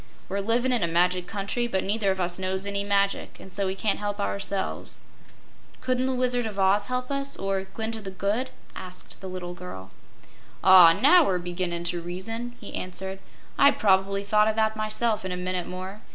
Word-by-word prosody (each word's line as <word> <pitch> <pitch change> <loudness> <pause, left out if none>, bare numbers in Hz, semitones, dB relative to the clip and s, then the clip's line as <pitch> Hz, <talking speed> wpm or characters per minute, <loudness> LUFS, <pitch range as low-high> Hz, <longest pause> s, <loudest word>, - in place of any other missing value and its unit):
We're 195 +2 -1
livin' 235 +5 +1
in 240 - +1
a 170 - +2
magic 180 +2 +2
country, 215 +4 -2
but 190 -5 -1
neither 205 0 0
of 190 0 0
us 175 0 -1
knows 190 +1 -2
any 200 0 -1
magic 200 0 0
an' 190 - -12
so 200 +1 -1
we 190 - -2
can't 205 +1 0
help 205 0 -3
ourselves." 100 - -2 0.8
"Couldn't 255 0 0
the 260 - 0
Wizard 245 -2 +1
of 210 -2 -7
Oz 195 +1 +3
help 250 +1 -3
us 275 0 -1
or 195 0 -2
Glinda 220 0 -3
the 195 - -6
Good?" 205 +7 -1 0.3
asked 185 -1 -9
the 190 - -6
little 180 -1 -5
girl. 95 - -9 0.7
"Ah, 185 -2 +9
now 335 - +6
we're 190 -9 +1
beginnin' 175 -1 -3
to 175 0 -2
reason," 225 +8 -5
he 205 - -9
answered. 190 +1 -4 0.4
"I'd 280 0 +6
probably 195 -4 +2
thought 210 +1 +3
o' 220 - +2
that, 220 0 +1
myself, 215 0 -1
in 185 - -4
a 180 - -3
minute 180 -1 -2
more. 185 +3 -7
195 Hz, 195 wpm, -26 LUFS, 185-220 Hz, 0.8 s, Ah